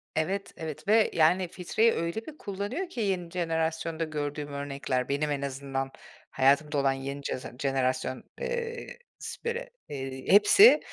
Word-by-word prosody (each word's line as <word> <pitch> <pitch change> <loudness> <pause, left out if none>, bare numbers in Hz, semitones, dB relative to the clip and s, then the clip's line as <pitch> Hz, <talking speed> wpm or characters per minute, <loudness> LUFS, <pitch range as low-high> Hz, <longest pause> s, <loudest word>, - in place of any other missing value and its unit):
Evet, 190 +6 -1
evet 160 +2 -6
ve, 215 +1 +5
yani, 175 +3 +4
filtreyi 205 +6 +2
öyle 170 +7 -2
bir 310 -1 -10
kullanıyor 205 - -4
ki 245 - -4
yeni 185 -5 -1
jenerasyonda 165 -1 -1
gördüğüm 150 -1 -3
örnekler, 140 -2 -2
benim 145 +1 0
en 140 -1 -1
azından 135 -1 -3 0.4
hayatımda 140 +3 +3
olan 135 -1 +3
yeni 140 +1 -5
ceze 130 - -4
jenerasyon, 130 -1 0 0.2
eee, 470 -1 -3 0.3
siperi 475 +2 -4 0.2
eee, 135 -2 -5
hepsi, 305 - +8
160 Hz, 135 wpm, -28 LUFS, 140-200 Hz, 0.4 s, hepsi